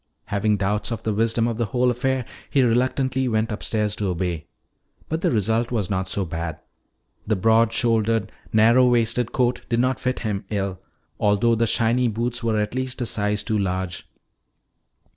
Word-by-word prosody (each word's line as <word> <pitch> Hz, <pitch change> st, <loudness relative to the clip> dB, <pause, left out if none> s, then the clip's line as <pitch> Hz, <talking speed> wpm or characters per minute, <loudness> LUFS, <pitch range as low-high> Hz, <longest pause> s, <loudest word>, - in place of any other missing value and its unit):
Having 105 Hz, 0 st, +1 dB
doubts 100 Hz, +2 st, -1 dB
of 110 Hz, -1 st, -4 dB
the 110 Hz, -, 0 dB
wisdom 115 Hz, +2 st, +1 dB
of 115 Hz, -2 st, -2 dB
the 120 Hz, -, 0 dB
whole 125 Hz, +2 st, +2 dB
affair, 130 Hz, +1 st, -1 dB, 0.2 s
he 140 Hz, -, +3 dB
went 120 Hz, -, +3 dB
reluctantly 130 Hz, +2 st, +1 dB
upstairs 110 Hz, -1 st, -1 dB
to 105 Hz, -, -1 dB
obey. 90 Hz, -3 st, -2 dB, 0.6 s
But 160 Hz, +1 st, -2 dB
the -, -, +2 dB
result 115 Hz, +1 st, +1 dB
was 105 Hz, -6 st, -2 dB
not 95 Hz, -1 st, -1 dB
so 100 Hz, -, -1 dB
bad. 80 Hz, -1 st, -4 dB, 0.7 s
The 110 Hz, -, +2 dB
broad 110 Hz, +3 st, +3 dB
shouldered, 115 Hz, -3 st, +1 dB, 0.2 s
narrow 115 Hz, +4 st, +5 dB
waisted 120 Hz, 0 st, +1 dB
coat 125 Hz, -1 st, +1 dB
did 120 Hz, -1 st, +1 dB
not 130 Hz, +1 st, +1 dB
fit 125 Hz, 0 st, -1 dB
him 105 Hz, -4 st, -2 dB
ill, 95 Hz, -3 st, -2 dB, 0.4 s
though 105 Hz, +3 st, +3 dB
the 115 Hz, 0 st, +2 dB
shiny 120 Hz, +3 st, +2 dB
boots 120 Hz, +2 st, -2 dB
were 115 Hz, -2 st, 0 dB
at 105 Hz, +1 st, -2 dB
least 130 Hz, 0 st, -3 dB
a 125 Hz, -, -1 dB
size 105 Hz, -2 st, 0 dB
too 110 Hz, -1 st, 0 dB
large. 95 Hz, -2 st, -3 dB
115 Hz, 175 wpm, -23 LUFS, 105-120 Hz, 0.7 s, narrow